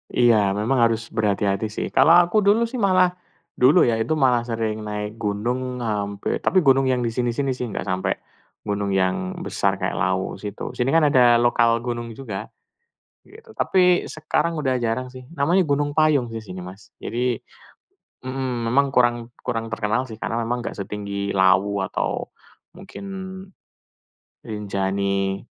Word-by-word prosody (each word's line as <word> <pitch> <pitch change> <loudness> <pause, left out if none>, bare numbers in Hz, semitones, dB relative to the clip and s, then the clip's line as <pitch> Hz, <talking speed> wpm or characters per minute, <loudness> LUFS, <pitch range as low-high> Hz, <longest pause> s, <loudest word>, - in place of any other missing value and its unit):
Iya, 105 -5 +4
memang 120 +5 0
harus 115 0 -3
berhati-hati 105 -1 0
sih. 105 - -4
Kalau 165 +2 +6
aku 175 +5 +1
dulu 210 +3 +3
sih 235 +1 -3
malah 185 -3 +4 0.5
dulu 135 +8 +6
ya, 115 -2 +1
itu 155 +8 0
malah 130 -5 +3
sering 110 -2 -2
naik 105 +1 -5
gunung 120 +4 -2
hampir 100 -2 -2
tapi 185 - +2
gunung 135 -1 +4
yang 125 -1 +1
di 115 - 0
sini-sini 125 +3 -1
sih 125 -1 -3
nggak 105 - -4
sampai 95 0 0 0.5
gunung 100 -1 -2
yang 95 - 0
besar 100 0 0
kayak 95 -1 -3
Lawu 95 +1 -1
situ. 105 0 -6
Sini 125 +2 -1
kan 165 - +5
ada 120 -2 +6
lokal 120 0 +3
gunung 120 -1 -3
juga, 110 -6 -6 0.8
gitu. 440 +2 -16
Tapi, 180 -1 +3
sekarang 155 +2 -1
udah 130 -3 0
jarang 115 +3 -1
sih. 130 0 -11
Namanya 170 +6 +3
Gunung 145 0 0
Payung 155 -5 +3
sih 110 - -5
sini, 90 -3 -8
Mas. 95 +2 -12
Jadi 120 +1 -1 0.9
mhm, 130 -2 -3
memang 140 +2 +3
kurang 120 -1 +4 0.3
kurang 115 -2 -2
terkenal 110 +3 0
sih, 110 - -8
karena 115 +1 -2
memang 120 +2 -1
nggak - - -5
setinggi 100 0 -4
Lawu 95 +2 +3
atau - - -2 0.5
mungkin 200 - -10 1.4
Rinjani. 100 -2 -1
115 Hz, 155 wpm, -22 LUFS, 100-135 Hz, 1.4 s, Kalau